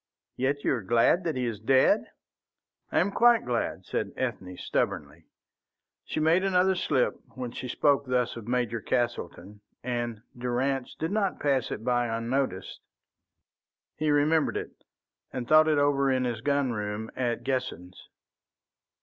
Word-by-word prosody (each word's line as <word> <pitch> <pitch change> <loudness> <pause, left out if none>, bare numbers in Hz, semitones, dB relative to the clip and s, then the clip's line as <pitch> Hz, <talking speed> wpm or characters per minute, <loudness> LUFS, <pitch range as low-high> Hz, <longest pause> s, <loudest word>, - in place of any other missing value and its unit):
"Yet 140 +3 -1
you - - +2
are 120 - -2
glad 115 - +3
that 165 - -1
he 125 -1 -1
is 115 -4 -3
dead?" 130 +4 +3 0.9
"I - - 0
am 185 +5 +1
quite 235 +1 +4
glad," 115 -6 -2
said 100 -2 -3
Ethne, 95 -8 -4
stubbornly. - - -3 0.8
She - - -3
made 160 +4 +3
another 190 0 +3
slip 145 -8 0 0.2
when 125 -2 -5
she 125 - -6
spoke 140 +2 +2
thus 125 -1 0
of 115 -2 -9
Major 120 -2 -1
Castleton, 105 -5 -3 0.2
and 120 -2 -3
Durrance 125 +2 -2
did 160 +3 -3
not 200 -2 0
pass 135 -4 +1
it - - -5
by 120 0 +1
unnoticed. 115 -3 -2 1.2
He 155 0 -1
remembered 150 +2 +2
it, - - -8 0.5
and 125 -2 -5
thought 155 +2 +6
it 155 -1 +3
over 140 -1 +3
in 130 -1 +1
his 120 -3 -2
gun 140 -1 +1
room 105 0 -4
at 120 -2 -1
Guessens. 125 -9 -4
125 Hz, 150 wpm, -28 LUFS, 115-145 Hz, 1.2 s, thought